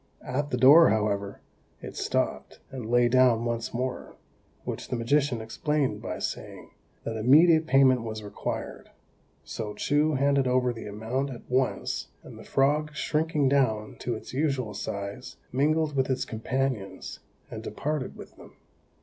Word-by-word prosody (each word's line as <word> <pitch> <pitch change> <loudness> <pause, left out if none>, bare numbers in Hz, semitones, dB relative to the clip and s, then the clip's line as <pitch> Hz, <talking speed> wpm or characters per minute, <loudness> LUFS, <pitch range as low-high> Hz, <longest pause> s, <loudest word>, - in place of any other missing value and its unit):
At 140 +3 -2
the 125 - -1
door, 145 +7 +8
however, 100 -2 -1 0.4
it - - -9
stopped, - - -2
and 125 -4 -6
lay 120 0 +4
down 120 -2 +4
once 120 0 -2
more, 125 +1 -4 0.5
which - - -5
the - - -2
magician 125 +1 +1
explained 145 +5 -1
by - - -4
saying, - - -6 0.3
that 115 -1 -4
immediate 155 +8 +5
payment 135 -3 +5
was 110 -1 -6
required; 105 - -5 0.5
so 105 -2 -6
Chou 145 +6 +1
handed 140 0 +2
over 125 -1 +2
the 115 - -8
amount 110 +7 -3
at 125 -3 -10
once, 130 +1 -1 0.2
and - - -12
the - - -10
frog, 150 +2 +1
shrinking 150 -2 0
down 125 -6 +1
to 120 - -2
its 110 - -9
usual 135 -6 -1
size, 100 0 -6
mingled 150 +3 +1
with 130 -1 +1
its 130 -1 0
companions, 115 -4 -3 0.3
and - - -6
departed 150 -2 -3
with - - -12
them. - - -15
130 Hz, 150 wpm, -27 LUFS, 115-140 Hz, 0.5 s, door